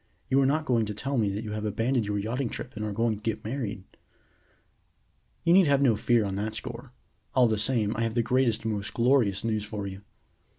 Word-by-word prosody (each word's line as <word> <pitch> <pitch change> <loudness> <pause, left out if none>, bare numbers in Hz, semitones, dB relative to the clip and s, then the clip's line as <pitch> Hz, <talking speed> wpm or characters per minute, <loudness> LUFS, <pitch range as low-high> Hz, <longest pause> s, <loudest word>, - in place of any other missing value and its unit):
You 135 +1 +5
are 135 - +3
not 155 +3 +1
going 115 -6 +1
to 105 - -5
tell 135 +4 -1
me 105 -3 +2
that 100 +3 -3
you 105 - -5
have 105 0 -3
abandoned 115 +2 0
your 105 0 -1
yachting 115 +5 -2
trip 125 - -7
and 110 - -4
are 105 - -2
going 115 +1 0
to - - -15
get 110 -1 -3
married?" 110 -5 -4 1.6
"You 170 - +4
need 185 -2 +6
have 140 -1 +4
no 120 -5 +4
fear 115 +1 +2
on 95 -1 -3
that 105 +2 -3
score. 120 +2 -6 0.4
All 125 -2 +6
the 110 -2 0
same, 110 -2 +1
I 115 - -2
have 115 0 -1
the 120 - +2
greatest 125 -3 +1
and 110 - 0
most 100 -1 -4
glorious 115 -5 +2
news 110 -2 -1
for 105 -1 -5
you. 95 0 -7
115 Hz, 230 wpm, -27 LUFS, 105-125 Hz, 1.6 s, need